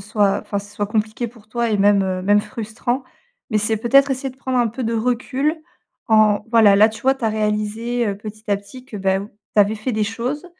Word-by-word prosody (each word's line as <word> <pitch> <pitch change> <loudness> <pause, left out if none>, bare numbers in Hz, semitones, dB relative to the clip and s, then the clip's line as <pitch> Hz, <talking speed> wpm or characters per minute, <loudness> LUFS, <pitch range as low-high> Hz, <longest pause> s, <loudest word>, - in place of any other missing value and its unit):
soit 205 -1 +1
enfin, 200 - -4
ce 205 +1 -10
soit 205 - -1
compliqué 215 +2 -1
pour 225 -2 -15
toi 235 +1 -1
et 210 - +2
même, 200 0 +4
heu, 185 -1 -2
même 205 +2 +4
frustrant 235 +3 -4 0.5
mais 215 - +2
c'est 215 +1 0
peut-être 275 +5 +4
essayer 270 +1 -2
de 255 - -18
prendre 260 -1 -2
un 240 -2 +3
peu 245 +4 -6
de 230 0 -1
recul 255 +6 0 0.5
en 215 -2 +4
voilà, 220 -4 +6
là, 210 +2 +6
tu 220 0 -10
vois? 265 +1 +3
Tu 270 - -18
as - - +3
réalisé, 215 +3 -1
heu, 200 - -2
petit 215 +1 -9
à 200 - +3
petit 205 +6 -13
que, 215 - -8
beh, 190 -1 +1 0.4
tu 210 - +6
avais 205 +2 +3
fait 220 +4 -3
des 215 -1 0
choses, 240 - -4
220 Hz, 230 wpm, -20 LUFS, 205-240 Hz, 0.5 s, voilà